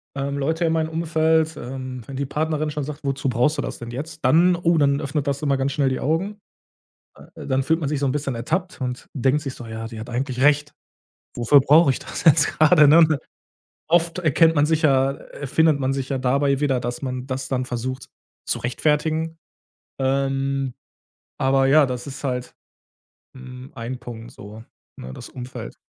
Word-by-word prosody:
ähm, 140 0 -3
Leute 160 +5 -1
in 160 - +1
meinem 160 -1 0
Umfeld, 160 -1 +1
ähm, 130 -1 -6
wenn 135 - -7
die 140 +1 -2
Partnerin 155 +1 -1
schon 150 -1 -3
sagt: 150 +1 -7
„Wozu 135 -1 -1
brauchst 125 +6 +1
du 145 - 0
das - - -6
denn 120 0 -7
jetzt?“ 155 +5 -7
Dann 170 +7 +5
oh, 170 -1 +1
dann 140 0 +2
öffnet 140 0 -2
das 140 +1 -1
immer 140 -2 +1
ganz 135 +1 -1
schnell 140 -2 +1
die 130 - -2
Augen, 190 +8 -1 0.8
äh, - - -12
dann 130 0 +1
fühlt 160 +3 +1
man 145 -3 -2
sich 150 - -1
so 140 - 0
'n 130 - +1
bisschen 140 -3 -2
ertappt 165 +10 -3
und 125 0 -4
denkt 135 +2 +1
sich 135 -4 -6
so: 120 - -9
„Ja, 115 0 -6
die 115 -1 -9
hat 115 +3 -8
eigentlich 130 +1 -3
recht. 145 0 +3 0.6
Wofür 120 +4 +5
brauche 150 +3 +5
ich 130 - 0
das - - -7
jetzt 155 -2 +5
grade”, 155 -1 +6
ne? 155 -1 +6 0.7
Oft 170 +1 +2
erkennt 165 0 +3
man 145 - +4
sich 160 0 0
ja, 135 -2 +4
äh 140 - -10
findet 155 +1 +3
man 135 0 0
sich 135 0 -4
ja 135 - -1
dabei 140 +2 +1
wieder, 135 -3 +1
dass 120 0 -4
man 130 -1 -4
das 130 0 -4
dann 130 -1 -1
versucht 130 +1 -4 0.4
zu - - -1
rechtfertigen. 155 +5 -1 0.6
Ähm, 135 0 0 0.6
aber 135 0 +2
ja, 145 +2 +6
das 125 -1 -5
ist 140 +1 -8
halt, 125 -2 -3 0.8
hm, 130 0 -11
ein 120 +2 -5
Punkt 120 -1 -9
so, 105 +3 -11 0.3
ne, 65 +1 -8
das - - -10
Umfeld. 125 0 -8
140 Hz, 195 wpm, -22 LUFS, 130-155 Hz, 0.8 s, grade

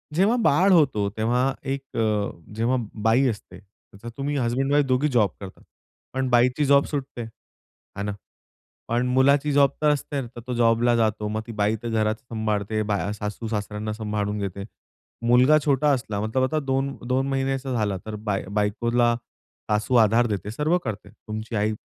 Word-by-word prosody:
जेव्हा 200 +8 +3
बाळ 185 +5 +4
होतो, 130 - +3
तेव्हा 125 +4 +1 0.2
एक 135 -2 -8
अ, 105 -2 +1 0.3
जेव्हा 115 +4 +1 0.3
बाई 120 +5 +4
असते, 105 -4 -7 0.4
तर 120 - -5
तुम्ही 145 +1 -2
हसबँड 130 +2 0
वाईफ 145 -1 +4
दोघी 130 +3 +2
जॉब 115 -7 +3
करतात. 95 -2 -10 0.5
पण 130 -1 -1
बाईची 125 +4 +3
जॉब 140 0 +5
सुटते. 140 -4 -5
हे 110 -2 -13
ना? 105 - -2 0.8
पण 120 +2 +1
मुलाची 140 +3 +3
जॉब 140 -1 +5
तर 150 - +4
असते 145 -1 -1
ना, 130 - -5
तर - - -6
तो 125 - -3
जॉबला 120 0 +3
जातो. 110 -2 0
मग 110 +1 -2
ती 115 - -7
बाई 105 +2 +2
तर 120 - -3
घरात 110 -1 +1
सांभाळते, 110 -2 -2
बा 105 -1 -1
सासू-सासऱ्यांना 105 0 -4
सांभाळून 105 -1 -2
घेते. 100 -1 -4 0.6
मुलगा 125 +5 +6
छोटा 145 0 +2
असला 115 -6 -2
मतलब 110 +5 0
आता 155 +4 0
2-2 135 -1 -1
महिन्याचा 135 0 -1
झाला 105 -5 0
तर 110 - -5
बाय 100 -2 -1
बायकोला 120 +3 +1 0.6
सासू 105 +4 0
आधार 115 +1 +4
देते. 105 -2 -3
सर्व 150 +9 +1
करते 105 -3 -5
तुमची 110 +1 -7
आई 105 +1 +1
120 Hz, 165 wpm, -24 LUFS, 105-135 Hz, 0.8 s, मुलगा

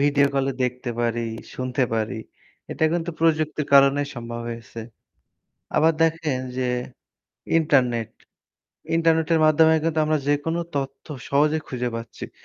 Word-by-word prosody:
Video 140 0 +4
call 135 -1 +1
এ - - -3
দেখতে 125 0 -3
পারি, 120 0 0 0.3
শুনতে 130 0 -1
পারি। 110 -1 -1 0.6
এটা - - 0
কিন্তু 170 0 -1
প্রযুক্তির 155 -2 +1
কারণেই 140 +1 +5
সম্ভব 120 -1 -6
হয়েছে। 115 0 -7 1.0
আবার 160 +2 +5
দেখেন 160 -4 0 0.2
যে 130 -1 0 0.9
ইন্টারনেট। 125 -8 +2 0.9
ইন্টারনেটের 165 0 +2
মাধ্যমে 160 +1 +5
কিন্তু 160 -1 0
আমরা 155 0 +1
যেকোন 145 +3 0 0.2
তথ্য 135 -1 -4 0.2
সহজে 150 +3 +2
খুঁজে 125 -1 -2
পাচ্ছি। 115 0 -8
140 Hz, 125 wpm, -23 LUFS, 125-160 Hz, 1.0 s, কারণেই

